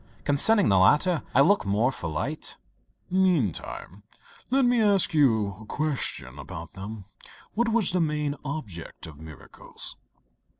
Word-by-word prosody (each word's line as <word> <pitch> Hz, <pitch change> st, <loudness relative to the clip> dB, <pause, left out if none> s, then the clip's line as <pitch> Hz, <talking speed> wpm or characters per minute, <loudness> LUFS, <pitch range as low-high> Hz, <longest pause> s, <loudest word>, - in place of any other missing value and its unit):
Concerning 195 Hz, +9 st, +4 dB
the 95 Hz, -2 st, +4 dB
latter 150 Hz, -, +4 dB
I 135 Hz, -, +7 dB
look 200 Hz, +8 st, +4 dB
for 100 Hz, -, -5 dB
more 110 Hz, +6 st, +2 dB
light." 85 Hz, -, -3 dB, 0.5 s
"Meantime 160 Hz, -, 0 dB, 0.5 s
let 265 Hz, +1 st, +3 dB
me 245 Hz, -1 st, +3 dB
ask 200 Hz, -3 st, +3 dB
you 110 Hz, -10 st, +2 dB
a -, -, -11 dB
question 135 Hz, -, -2 dB
about 80 Hz, +4 st, -8 dB
them. 100 Hz, +1 st, -8 dB, 0.5 s
What 235 Hz, +1 st, +1 dB
was 225 Hz, -2 st, +2 dB
the 180 Hz, 0 st, +1 dB
main 150 Hz, -2 st, -1 dB
object 135 Hz, -, -7 dB
of 75 Hz, -3 st, -12 dB
miracles?" 80 Hz, -4 st, -9 dB
140 Hz, 135 wpm, -26 LUFS, -, 0.5 s, I